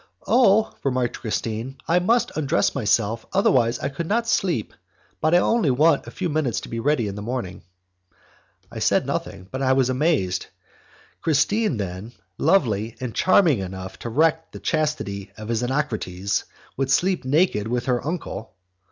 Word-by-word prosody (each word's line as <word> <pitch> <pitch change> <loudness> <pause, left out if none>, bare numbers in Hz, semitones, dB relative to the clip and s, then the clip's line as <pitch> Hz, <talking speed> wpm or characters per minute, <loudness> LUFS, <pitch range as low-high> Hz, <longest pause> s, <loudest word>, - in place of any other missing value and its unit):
"Oh!" 220 -3 +4
remarked 130 -3 -1
Christine, 115 +4 -3
"I 170 +2 +4
must 230 +7 +1
undress 155 +1 +1
myself, 110 -2 +1
otherwise 125 -11 +3
I 140 - -3
could 160 +4 -5
not 230 +4 0
sleep, 175 - 0 0.5
but 155 +2 +3
I - - +8
only 220 -2 +2
want 145 +4 +3
a - - -5
few 185 - -3
minutes 150 -7 0
to - - -9
get 115 0 -3
ready 130 -4 +1
in 100 - -4
the 105 - -7
morning." 110 -5 -4 1.1
I - - -6
said - - +2
nothing, 90 - -4
but 130 - -4
I 130 -1 +3
was 130 -1 +2
amazed. 130 - 0 0.7
Christine 165 - +1
then, 100 +3 -5 0.3
lovely 115 - +2
and 125 -3 -4
charming 180 - +4
enough 95 0 -7
to 120 - -5
wreck 160 +6 +1
the - - -9
chastity 150 -11 -2
of 110 +1 -6
a - - +2
Xenocrates, 115 -7 -1 0.3
would 135 0 -1
sleep 180 +6 +2
naked 130 - +2
with 120 +1 -1
her 125 -2 0
uncle! 140 - -5
130 Hz, 160 wpm, -23 LUFS, 110-160 Hz, 1.1 s, I